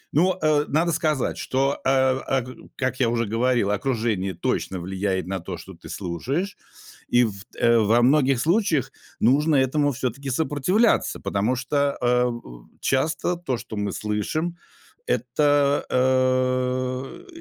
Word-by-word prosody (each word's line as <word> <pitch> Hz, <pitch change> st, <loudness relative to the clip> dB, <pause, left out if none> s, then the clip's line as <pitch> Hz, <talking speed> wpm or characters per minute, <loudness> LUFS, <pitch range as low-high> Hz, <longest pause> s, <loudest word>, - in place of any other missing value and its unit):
Ну, 180 Hz, +4 st, +3 dB
э, 150 Hz, -1 st, +3 dB
надо 165 Hz, +4 st, +2 dB
сказать, 155 Hz, -4 st, 0 dB
что, 135 Hz, +2 st, 0 dB
э, -, -, +1 dB, 0.4 s
аг 130 Hz, -3 st, 0 dB, 0.3 s
как 130 Hz, -1 st, -2 dB
я 120 Hz, -3 st, +3 dB
уже 115 Hz, 0 st, 0 dB
говорил, 115 Hz, 0 st, +1 dB
окружение 105 Hz, -4 st, -1 dB
точно 90 Hz, +2 st, -2 dB
влияет 95 Hz, 0 st, -2 dB
на 95 Hz, 0 st, -3 dB
то, 90 Hz, 0 st, -6 dB
что 95 Hz, +3 st, -11 dB
ты 85 Hz, -, -13 dB
слушаешь, 130 Hz, -, -3 dB, 0.5 s
и 120 Hz, 0 st, +4 dB
в, 100 Hz, -3 st, -4 dB, 0.2 s
э, 120 Hz, 0 st, +4 dB
во 110 Hz, +3 st, +3 dB
многих 135 Hz, -1 st, +3 dB
случаях 165 Hz, -, +1 dB, 0.3 s
нужно 145 Hz, +6 st, +3 dB
этому 145 Hz, +2 st, +2 dB
всё-таки 130 Hz, +2 st, -4 dB
сопротивляться, 160 Hz, -, +1 dB
потому 105 Hz, +6 st, 0 dB
что, 130 Hz, +3 st, -4 dB, 0.3 s
э, 125 Hz, 0 st, +2 dB, 0.5 s
часто 155 Hz, +6 st, 0 dB
то, 135 Hz, -8 st, -3 dB
что 110 Hz, -, -8 dB
мы 105 Hz, -1 st, -2 dB
слышим 105 Hz, -, -2 dB, 0.6 s
это, 145 Hz, +3 st, +2 dB
э, 130 Hz, -, 0 dB
130 Hz, 135 wpm, -24 LUFS, 110-145 Hz, 0.6 s, и